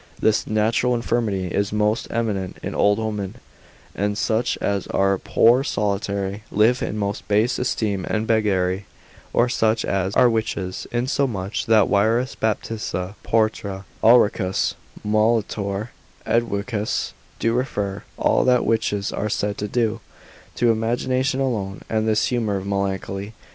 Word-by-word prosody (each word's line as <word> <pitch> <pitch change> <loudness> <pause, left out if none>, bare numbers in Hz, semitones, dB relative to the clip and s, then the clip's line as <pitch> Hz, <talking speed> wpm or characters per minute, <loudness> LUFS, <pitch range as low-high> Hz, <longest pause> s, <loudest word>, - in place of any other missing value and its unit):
This 110 -1 +2
natural 115 +3 +2
infirmity 115 -6 -1
is 100 +3 0
most 105 +1 +1
eminent 105 -5 -2
in - - -3
old 105 0 +3
women, 105 -2 -3 0.6
and 105 +1 -1
such 115 +2 0
as 100 -1 -1
are 95 -1 +1
poor, 120 +4 +4
solitary, 100 -3 -2
live 115 +5 +3
in 105 - -2
most 100 -1 -3
base 105 +4 +2
esteem 105 -6 -1
and 110 +1 0
beggary, 100 -4 +1 0.4
or 120 - +3
such 110 -2 +1
as 95 0 -1
are 125 - +6
witches; 110 -5 -2
insomuch 120 -5 -1
that 110 -3 +5
Wierus, 115 +6 +2
Baptista 105 -4 -2
Porta, 105 -3 0 0.2
Ulricus 110 -5 +4 0.3
Molitor, 105 -1 0 0.4
Edwicus, 110 -1 -1 0.2
do 115 - +1
refer 105 -6 -2 0.2
all - - +3
that 125 -1 +3
witches 105 -3 0
are 105 - -2
said 105 0 -1
to 105 - -2
do, 115 0 0 0.5
to 120 -1 +3
imagination 130 +4 0
alone, 105 -7 -2
and 110 0 +1
this 110 -1 +2
humour 115 -5 0
of 95 - -5
melancholy. 100 +1 -3
105 Hz, 130 wpm, -22 LUFS, 100-115 Hz, 0.6 s, are